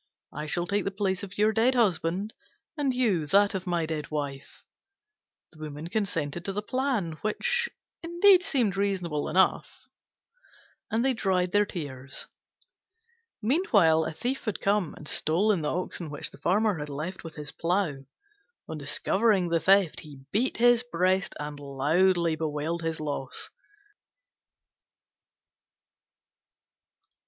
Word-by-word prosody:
I 150 0 -5
shall 175 +3 +1
take 200 +2 0
the - - -1
place 195 -1 -1
of 200 -1 -7
your 215 +1 +3
dead 240 +4 +3
husband, 195 -2 +1 0.4
and 290 -4 0
you, 215 -12 +1
that 200 +5 +4
of 190 -1 -4
my 170 -2 0
dead 155 -2 -4
wife." 145 -2 -5 0.9
The 155 - -17
Woman 155 +1 -7
consented 175 -6 -2
to 195 - -2
the 210 +2 -3
plan, 225 - -1
which 480 - +1 0.3
indeed 350 +3 +5
seemed 245 - +1
reasonable 185 -7 -1
enough: 190 +3 +1 1.0
and 230 +3 0
they 265 - +3
dried 185 -5 0
their 205 +1 +3
tears. 140 -6 -5 1.2
Meanwhile, 205 - +3
a - - -3
thief 250 - -3
had 215 - -2
come 200 -5 0
and 150 - -9
stolen 185 +6 +2
the 150 - -1
oxen 175 -2 -3
which 145 - -5
the - - -15
Farmer 205 0 +1
had 150 0 -5
left 155 +6 -5
with 165 -1 -9
his 150 -1 -5
plough. 165 -5 -1 0.6
On 160 - -6
discovering 190 +6 +1
the 165 0 +2
theft, 195 -2 +3
he 145 -4 -11
beat 240 +6 +1
his 240 0 +5
breast 185 -4 0
and 150 -1 -6
loudly 160 +5 +2
bewailed 155 +2 -2
his 165 -1 -3
loss. 145 -3 -3
180 Hz, 135 wpm, -27 LUFS, 155-210 Hz, 1.2 s, indeed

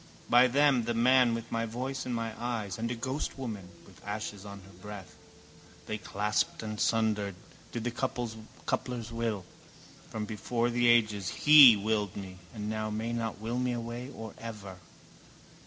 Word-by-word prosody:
By 125 +2 +7
them, 135 -2 +3
the 120 0 -1
man 125 0 +5
with 115 0 -7
my 115 0 -1
voice 130 +4 -4
and 125 - -1
my 115 -1 -3
eyes 110 -5 -3
and 115 +1 -1
a 120 - -2
ghostwoman 120 -5 -4 0.2
with - - -18
ashes 105 -1 -5
on 100 -1 -9
her 95 +1 -16
breath. 105 -3 -9 0.7
They 110 0 -4
clasped 105 +2 -1
and 110 -1 -5
sundered, 105 -4 +1 0.4
did 120 - -4
the 120 - -1
coupler's 120 -1 -4
will. 115 -5 -2 0.6
From 110 -1 -4
before 115 +3 -1
the 120 0 +2
ages 110 -5 +3
He 145 -6 +9
willed 105 -1 -1
me 95 -2 -8
and 105 -2 -5
now 110 0 -2
may 110 +2 -3
not 115 -2 -2
will 115 +3 -2
me 125 -1 0
away 120 +2 -5
or 110 -6 -8
ever. 105 -5 -8
115 Hz, 160 wpm, -30 LUFS, 105-120 Hz, 0.7 s, He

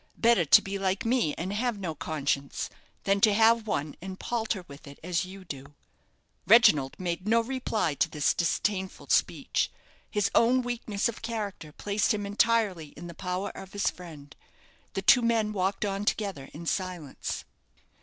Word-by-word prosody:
Better 230 -7 +4
to - - +7
be 195 0 -4
like 195 +1 -1
me 230 - +1
and 185 +4 -3
have 235 +1 -1
no 180 -5 -3
conscience, 140 -3 -2 0.3
than 200 0 +2
to 210 -1 +5
have 225 0 +4
one 150 -7 -2
and 190 +1 -7
palter 220 -5 -2
with 140 +1 -12
it 140 - -11
as 180 +1 0
you 190 +1 -11
do." 140 -2 -9 0.7
Reginald 165 - +5
made 180 +1 -3
no 230 +2 +4
reply 230 - -1
to 160 - +1
this 150 -2 +1
disdainful 190 +2 -1
speech. - - +1 0.4
His 205 -2 0
own 250 +2 +4
weakness 230 -4 -1
of 235 - -6
character 210 -8 -4
placed 205 +6 0
him 205 -1 -3
entirely 205 -5 +1
in 170 - -8
the 170 - -8
power 180 +3 -3
of 190 - -11
his 205 - +1
friend. 160 -4 -12 0.6
The 195 - -3
two 245 - +7
men 225 -2 +1
walked 195 +1 0
on 200 0 -2
together 195 -11 -2
in 170 +3 -9
silence. 180 -5 -3
195 Hz, 165 wpm, -28 LUFS, 170-220 Hz, 0.7 s, to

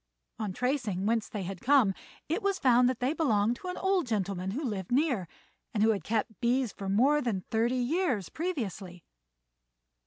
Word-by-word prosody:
On 215 -3 -2
tracing 235 -5 -1
whence 225 0 +1
they 205 -3 -4
had 185 0 -6
come, 250 -6 +4 0.3
it 335 +8 -1
was 395 -1 0
found 250 -1 +4
that 255 - -2
they 260 +4 +1
belonged 235 -7 +1
to 365 - -9
an 360 - -4
old 380 -6 +1
gentleman 195 -4 -2
who 260 +11 -3
lived 205 -7 -4
near, 250 - +1 0.5
and 210 - +3
who 225 - +5
had 200 -6 -2
kept 220 0 -2
bees 245 -1 +1
for 195 -1 -6
more 270 +9 +4
than 220 -8 -1
thirty 230 +3 +2
years 255 - 0
previously. 210 - -4
235 Hz, 180 wpm, -29 LUFS, 200-275 Hz, 0.5 s, who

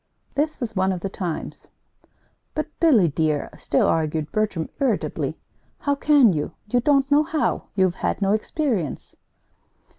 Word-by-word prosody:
This 305 +2 -1
was 230 -4 -4
one 190 0 +2
of 180 -2 -3
the 195 - -3
times. 180 -4 -5 0.9
"But, 310 - -1
Billy, 255 - +5
dear," 155 -1 -1
still 140 - +1
argued 155 -1 0
Bertram, 210 -7 -1
irritably, 265 -6 -1 0.4
"how 285 - 0
can 280 -7 +5
you? 150 -2 -3
You 245 +4 +1
don't 275 +2 +2
know 290 +1 +6
how. 310 0 -1
You've 190 -3 +3
had - - 0
no 195 -1 +1
experience." 220 - -2
215 Hz, 145 wpm, -23 LUFS, 170-285 Hz, 0.9 s, know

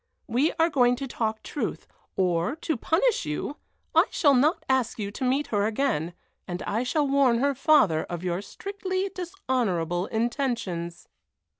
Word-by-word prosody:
We 255 +7 +2
are 330 +1 +2
going 245 -3 +4
to 270 +2 -5
talk 220 -3 -2
truth, 295 - -4 0.3
or, 180 - +1
to 320 0 -2
punish 375 - +1
you, 150 - -3 0.4
I - - +6
shall 285 -3 +3
not 290 +6 +3
ask 260 -3 +1
you 200 -2 -3
to 235 - -6
meet 265 +3 +1
her 205 0 +2
again, 215 - -1 0.3
and 180 0 -4
I 220 +3 -1
shall 285 +4 +1
warn 270 -3 +4
her 280 +3 +2
father 265 - +3
of 175 0 -6
your 180 +1 -1
strictly 385 - -4
dishonorable 235 - -1
intentions." 225 -8 -2
250 Hz, 155 wpm, -26 LUFS, 195-290 Hz, 0.4 s, I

